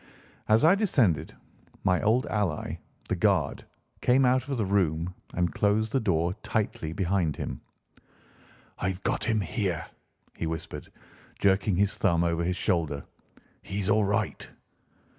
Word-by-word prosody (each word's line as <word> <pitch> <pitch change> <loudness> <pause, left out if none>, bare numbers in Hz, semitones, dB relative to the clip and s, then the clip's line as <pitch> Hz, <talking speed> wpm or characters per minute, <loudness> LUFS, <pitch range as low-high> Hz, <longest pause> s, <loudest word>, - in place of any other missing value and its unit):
As 110 +5 +5
I 165 - +7
descended, 135 - +1 0.5
my 90 0 +2
old 115 +4 +2
ally, 100 -8 -2 0.3
the - - 0
guard, - - +1 0.4
came 130 +2 +4
out 130 +2 +2
of 135 -2 -2
the 110 - 0
room 90 -3 +1 0.2
and 90 -1 0
closed 105 +2 +1
the 135 - +2
door 85 -6 +1
tightly 100 -7 -2
behind 90 -3 0
him. - - -5 1.2
"I've 95 0 -2
got - - 0
him 110 -2 +1
here," 90 -2 -2 0.5
he 85 - -3
whispered, 80 -1 -6 0.5
jerking 100 0 +2
his 100 +2 +2
thumb 85 0 +3
over 85 0 0
his 90 +1 -1
shoulder; 75 -5 0 0.6
"he's 100 0 -2
all 110 0 +4
right." 100 0 -1
95 Hz, 140 wpm, -28 LUFS, 85-110 Hz, 1.2 s, I